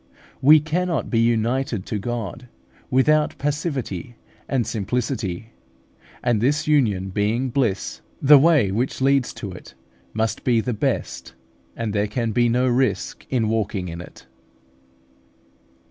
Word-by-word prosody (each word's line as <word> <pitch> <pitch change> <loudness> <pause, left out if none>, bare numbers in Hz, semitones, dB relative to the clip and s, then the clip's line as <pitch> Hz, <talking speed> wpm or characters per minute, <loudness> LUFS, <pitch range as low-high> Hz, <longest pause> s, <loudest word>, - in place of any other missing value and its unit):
We 155 +4 +8
cannot 160 -1 -2
be 115 - +2
united 115 -1 0
to 105 - -3
God 120 +2 -5 0.4
without 150 +4 +2
passivity 140 - -3 0.3
and 130 -4 +1
simplicity; 110 -2 -3 0.7
and 120 -4 +1
this 150 +5 +1
union 105 -11 +2
being 110 +6 0
bliss, 115 -7 -1 0.2
the 145 +1 +7
way 145 - +4
which 120 +6 -1
leads 135 -1 +2
to 100 - -6
it 90 -6 -12 0.4
must 110 +3 -2
be 120 -3 +3
the 125 +2 -2
best, 105 - -3 0.4
and 115 -3 -3
there 105 0 +1
can 115 +1 -2
be 120 +2 +2
no 125 +2 +2
risk 120 -7 -1
in 120 -4 +1
walking 105 -4 -1
in 85 +1 -6
it. 90 - -13
120 Hz, 130 wpm, -22 LUFS, 105-135 Hz, 0.7 s, We